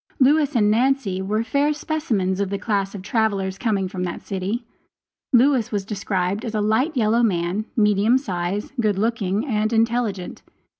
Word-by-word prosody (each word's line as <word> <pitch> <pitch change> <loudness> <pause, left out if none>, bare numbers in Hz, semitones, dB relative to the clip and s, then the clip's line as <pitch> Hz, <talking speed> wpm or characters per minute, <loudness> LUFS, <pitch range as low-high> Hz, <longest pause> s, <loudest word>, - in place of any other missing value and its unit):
Lewis 290 +1 +3
and 210 -3 +4
Nancy 235 -5 +1
were 210 +4 -1
fair 285 +5 +1
specimens 240 - -1
of 200 -1 0
the 200 - -2
class 200 -2 -1
of 190 - -7
travelers 195 -3 -1
coming 205 -5 0
from 185 0 -5
that 175 -1 -5
city. 200 +5 -3 0.7
Lewis 255 -2 +3
was 200 -3 -2
described 200 0 -2
as 225 -3 -4
a - - +1
light 220 +9 +1
yellow 225 0 +3
man, 190 -1 0
medium 210 +3 +4
size, 190 -5 -3
good 210 -3 +1
looking, 215 0 0
and 215 -4 0
intelligent. 225 -4 0
215 Hz, 160 wpm, -22 LUFS, 195-240 Hz, 0.7 s, and